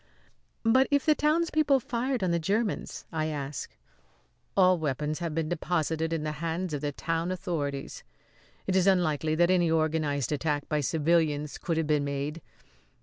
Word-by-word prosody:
"But 255 +4 +4
if 285 -2 +2
the 310 - +6
townspeople 305 -2 +2
fired 245 0 -2
on 180 - +1
the 170 - +1
Germans?" 205 +5 -2
I 155 -2 -1
asked. 145 -2 -5 0.8
"All 185 -2 +5
weapons 150 +1 -2
had 170 -3 -3
been 165 -1 0
deposited 160 -1 -1
in 165 -2 -1
the 155 - -2
hands 170 +1 -2
of 145 - -2
the 145 -1 -1
town 165 +4 -2
authorities. 150 -7 -4 0.6
It 190 - 0
is 190 0 +3
unlikely 160 -5 +2
that 175 +2 +4
any 175 -2 +3
organised 155 -4 0
attack 150 -1 -1
by 150 -1 0
civilians 150 0 +1
could 165 -3 -2
have 160 - +1
been 150 -1 +2
made. 140 +3 -3
165 Hz, 160 wpm, -28 LUFS, 150-185 Hz, 0.8 s, the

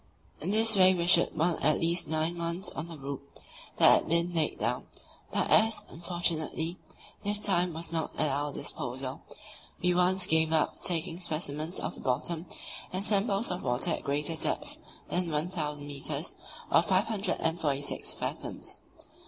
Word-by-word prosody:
In 165 - -5
this 220 +1 +5
way 185 -1 +5
we 170 -1 -2
should 175 -1 +5
want 165 +2 0
at 155 - +4
least 170 +1 +3
nine 160 +2 -1
months 170 +2 -2
on 155 - -6
the 165 -2 -10
route 140 -1 -6 0.6
that - - +7
had - - +1
been 170 +2 +3
laid 160 -3 +1
down; 120 +4 -3 0.4
but - - 0
as, 220 0 +5
unfortunately, 170 0 -1 0.5
this 205 +1 +1
time 180 -4 +2
was 165 +1 -2
not 160 -1 -2
at 155 - +3
our 145 +1 -2
disposal, 130 0 -4 0.6
we 180 - +1
at 175 - 0
once 180 +1 +3
gave 160 -2 +3
up 160 -1 0
taking 165 -1 +1
specimens 155 -1 -1
of - - -4
the - - -12
bottom 155 +6 -1 0.4
and 185 +2 -2
samples 205 0 +2
of 180 - -4
water 125 +7 +1
at - - -3
greater 150 +3 -1
depths - - 0 0.3
than 175 -1 +1
1,000 150 -2 -3
metres 145 +3 -2 0.4
(546 170 -6 0
fathoms). - - -7
165 Hz, 155 wpm, -29 LUFS, 150-180 Hz, 0.6 s, that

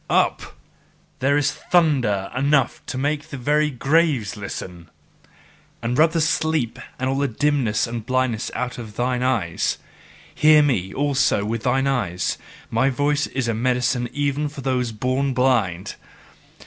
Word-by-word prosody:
Up! - - 0 0.6
There 140 +2 +2
is 145 -1 +2
thunder 135 - +1
enough 135 0 +1
to - - -4
make 145 +2 -1
the 140 - -6
very 150 +4 +2
graves 140 -4 +1
listen! 90 -4 -7 0.9
And 120 +1 -2
rub 160 +4 +4
the 165 - +1
sleep 155 -5 0 0.2
and 130 - -2
all 135 +1 0
the 140 - +1
dimness 130 -4 +1
and 115 -1 -5
blindness 130 -1 0
out 125 0 -3
of 110 -3 -9
thine 125 +1 0
eyes! 110 -10 0 0.6
Hear 155 0 +6
me 100 -10 0
also 140 -7 +1
with 115 +1 -2
thine 130 +3 +1
eyes: 120 -10 -1 0.3
my 130 +4 +2
voice 145 +2 0
is 130 -3 -2
a 115 - +1
medicine 125 +1 0
even 145 +1 -1
for 145 -1 -9
those 125 -2 -1
born 130 +4 -1
blind. 110 -8 +1
130 Hz, 150 wpm, -22 LUFS, 115-145 Hz, 0.9 s, Hear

